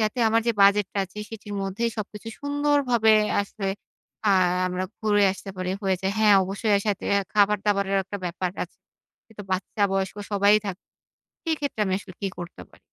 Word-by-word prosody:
যাতে 215 Hz, +2 st, 0 dB
আমার 225 Hz, +1 st, +3 dB
যে 235 Hz, -, +3 dB
বাজেট 200 Hz, 0 st, +5 dB
টা -, -, -1 dB
আছে, 190 Hz, +3 st, -12 dB
সেটির 210 Hz, -2 st, -8 dB
মধ্যেই 195 Hz, +5 st, -1 dB
সবকিছু 210 Hz, +1 st, -6 dB
সুন্দরভাবে 285 Hz, -6 st, +3 dB, 0.3 s
আসলে। 200 Hz, 0 st, -5 dB, 0.6 s
আ -, -, +5 dB, 0.4 s
আমরা 180 Hz, +1 st, -2 dB, 0.2 s
ঘুরে 205 Hz, -2 st, +3 dB
আসতে 195 Hz, 0 st, -9 dB
পারি 185 Hz, 0 st, -3 dB
হয়ে 190 Hz, -1 st, +1 dB
যায়। 190 Hz, 0 st, -1 dB
হ্যাঁ, 215 Hz, -2 st, +6 dB
অবশ্যই 200 Hz, +3 st, -1 dB
এর 200 Hz, -, -1 dB
সাথে 205 Hz, -2 st, -1 dB, 0.3 s
খাবার 210 Hz, 0 st, +4 dB
দাবারের 200 Hz, -1 st, +2 dB
একটা 195 Hz, +2 st, -5 dB
ব্যাপার 180 Hz, +1 st, -2 dB
আছে। -, -, -9 dB, 0.5 s
কিন্তু 220 Hz, -2 st, -11 dB
বাচ্চা 190 Hz, +2 st, -2 dB
বয়স্ক 195 Hz, +1 st, -1 dB, 0.2 s
সবাই 200 Hz, +1 st, +5 dB
থাকবে। 195 Hz, -1 st, -6 dB, 0.6 s
সেই 325 Hz, -2 st, 0 dB
ক্ষেত্রে 285 Hz, -6 st, -3 dB
আমি 190 Hz, -, +1 dB
আসলে 195 Hz, -2 st, -12 dB
কি 200 Hz, -, -1 dB
করতে 175 Hz, 0 st, -8 dB
পারি? -, -, -21 dB
205 Hz, 180 wpm, -25 LUFS, 195-220 Hz, 0.6 s, হ্যাঁ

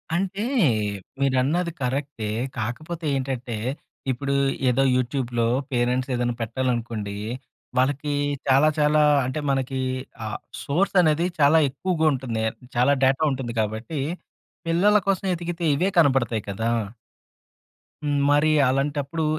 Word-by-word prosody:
అంటే 195 Hz, +3 st, -1 dB, 0.8 s
మీరన్నది 140 Hz, +6 st, +1 dB
కరెక్టే, 130 Hz, -3 st, -2 dB, 0.3 s
కాకపోతే 155 Hz, +9 st, -4 dB
ఏంటంటే 130 Hz, -3 st, -3 dB, 0.6 s
ఇప్పుడు 140 Hz, +2 st, -2 dB, 0.4 s
ఏదో 130 Hz, +2 st, +2 dB
యూట్యూబ్‌లో 120 Hz, -2 st, 0 dB, 0.3 s
పేరెంట్స్ 125 Hz, +1 st, 0 dB
ఏదన్న 120 Hz, 0 st, 0 dB
పెట్టాలనుకోండి, 115 Hz, -3 st, -2 dB, 0.6 s
వాళ్ళకి 145 Hz, +3 st, +1 dB, 0.4 s
చాలా 135 Hz, +3 st, +5 dB
చాలా 150 Hz, +1 st, +4 dB, 0.2 s
అంటే 130 Hz, +4 st, -2 dB
మనకి, 135 Hz, 0 st, -1 dB, 0.5 s
ఆ -, -, -3 dB, 0.4 s
సోర్స్ 185 Hz, +8 st, 0 dB
అనేది 160 Hz, 0 st, +2 dB
చాలా 150 Hz, +3 st, +6 dB
ఎక్కువగుంటుంది. 135 Hz, -7 st, 0 dB, 0.3 s
చాలా 125 Hz, +4 st, +4 dB
డేటా 135 Hz, +2 st, +3 dB
ఉంటుంది 125 Hz, -3 st, -4 dB
కాబట్టి 110 Hz, +8 st, -3 dB, 0.7 s
పిల్లల 195 Hz, +6 st, +4 dB
కోసం 195 Hz, 0 st, +1 dB
వెతికితే 175 Hz, 0 st, -3 dB
ఇవే 185 Hz, +6 st, +1 dB
కనబడతాయి 130 Hz, -7 st, +2 dB
కదా. 100 Hz, +3 st, -4 dB, 1.4 s
హ్మ్. 145 Hz, -1 st, 0 dB
మరి 145 Hz, +2 st, +4 dB, 0.2 s
అలాంటప్పుడు 145 Hz, +3 st, -1 dB
135 Hz, 105 wpm, -24 LUFS, 125-155 Hz, 1.4 s, చాలా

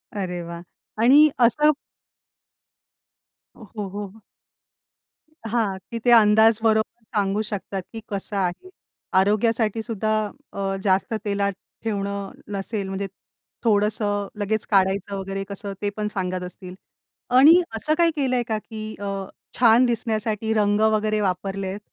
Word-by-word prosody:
अरे 180 Hz, -3 st, -3 dB
वाह! 170 Hz, 0 st, -7 dB, 0.4 s
आणि 290 Hz, +5 st, +7 dB, 0.2 s
असं 300 Hz, +6 st, +4 dB, 1.8 s
हो, 225 Hz, -, -13 dB
हो, 205 Hz, -2 st, -3 dB
हो. 205 Hz, +2 st, -8 dB, 1.3 s
हां, 215 Hz, -5 st, +1 dB
की 230 Hz, -, -3 dB
ते -, -, +6 dB
अंदाज 220 Hz, +1 st, +5 dB
बरोबर 220 Hz, +1 st, 0 dB
सांगू 200 Hz, +1 st, +1 dB
शकतात, 195 Hz, -1 st, -4 dB
की 225 Hz, -, -6 dB
कसं 200 Hz, +1 st, -4 dB
आहे. 185 Hz, -, -2 dB, 0.5 s
आरोग्यासाठीसुद्धा 220 Hz, +1 st, 0 dB, 0.4 s
अ, 195 Hz, -1 st, -2 dB
जास्त 190 Hz, +3 st, +2 dB
तेलात 200 Hz, -1 st, 0 dB, 0.3 s
ठेवणं 200 Hz, -2 st, -3 dB, 0.2 s
नसेल 200 Hz, 0 st, -3 dB
म्हणजे 195 Hz, +1 st, -3 dB, 0.6 s
थोडंसं 205 Hz, -2 st, +1 dB
लगेच 215 Hz, +1 st, -1 dB
काढायचं 195 Hz, +1 st, +2 dB
वगैरे 195 Hz, 0 st, -4 dB
कसं, 200 Hz, 0 st, -5 dB
ते 205 Hz, -, 0 dB
पण 210 Hz, 0 st, -1 dB
सांगत 185 Hz, -1 st, -2 dB
असतील. 180 Hz, 0 st, -8 dB, 0.6 s
आणि 315 Hz, +7 st, +8 dB
असं 305 Hz, +8 st, 0 dB
काही 340 Hz, -1 st, +4 dB
केलंय 255 Hz, -4 st, +1 dB
का, 220 Hz, -, 0 dB
की 215 Hz, 0 st, -8 dB, 0.2 s
अ, 200 Hz, 0 st, -4 dB, 0.5 s
छान 235 Hz, +1 st, +6 dB
दिसण्यासाठी 220 Hz, -2 st, -1 dB
रंग 205 Hz, -1 st, +2 dB
वगैरे 215 Hz, 0 st, +1 dB
वापरलेत? 195 Hz, +1 st, -2 dB
210 Hz, 125 wpm, -23 LUFS, 195-225 Hz, 1.8 s, आणि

